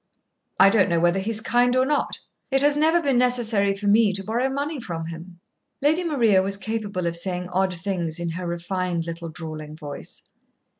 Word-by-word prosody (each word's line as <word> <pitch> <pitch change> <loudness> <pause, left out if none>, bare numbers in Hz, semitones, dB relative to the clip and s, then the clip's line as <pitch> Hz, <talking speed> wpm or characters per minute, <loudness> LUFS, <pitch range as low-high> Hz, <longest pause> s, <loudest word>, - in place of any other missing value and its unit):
"I 195 - +8
don't 200 -3 +3
know 170 -1 +2
whether 175 +3 +2
he 195 +3 -3
is 220 -1 -1
kind 245 +2 +2
or 255 0 +3
not. 295 +2 0 0.3
It 270 0 +2
has 290 0 +4
never 320 +3 +3
been 270 -4 +2
necessary 225 -5 +2
for 200 +1 -7
me 210 0 +4
to 195 0 -3
borrow 235 +6 0
money 285 +2 -3
from 165 -8 -5
him." 170 +2 -9 0.4
Lady 310 +5 +2
Maria 235 - +3
was 195 +1 0
capable 205 -3 -3
of 170 0 -1
saying 180 +1 -3
odd 185 0 0
things 170 -3 -3
in 170 -1 -2
her 175 +2 -5
refined 175 0 -2
little 170 0 -6
drawling 155 -2 -7
voice. 150 -2 -10
195 Hz, 195 wpm, -24 LUFS, 170-245 Hz, 0.4 s, I